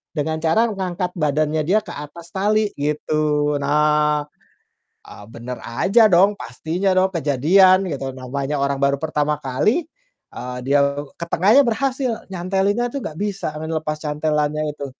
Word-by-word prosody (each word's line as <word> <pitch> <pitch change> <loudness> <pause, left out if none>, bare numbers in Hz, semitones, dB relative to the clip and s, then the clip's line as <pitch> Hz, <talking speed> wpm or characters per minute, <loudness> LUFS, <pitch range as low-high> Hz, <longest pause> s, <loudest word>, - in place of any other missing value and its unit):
dengan 160 +1 -1
cara 195 +8 +3
ngangkat 185 -2 -3
badannya 155 -1 0
dia 210 +4 +4
ke 175 - -9
atas 165 +4 -10
tali, 210 +2 +1
gitu. 150 0 0
Nah, 150 0 +2 0.8
ah, 105 - -12
bener 120 +2 -8
aja 215 - +3
dong, 195 +4 +5
pastinya 165 +10 -2
dong, 190 +1 +3
kejadian 180 +6 +4
gitu, 135 -3 -4
namanya 135 +3 -3
orang 140 0 0
baru 140 0 +3
pertama 150 -1 0
kali, 150 - 0 0.5
eee, 125 0 -6
dia 140 +1 +3 0.3
ke 170 - -6
tengahnya 215 +11 +5
berhasil 255 0 -1
nyantelinnya 195 +6 0
tuh 280 - -3
enggak 155 - -6
bisa, 195 -6 -3
lepas 155 -1 -3
cantelannya 150 0 -1
itu. 140 - -6
155 Hz, 140 wpm, -21 LUFS, 145-190 Hz, 0.8 s, dong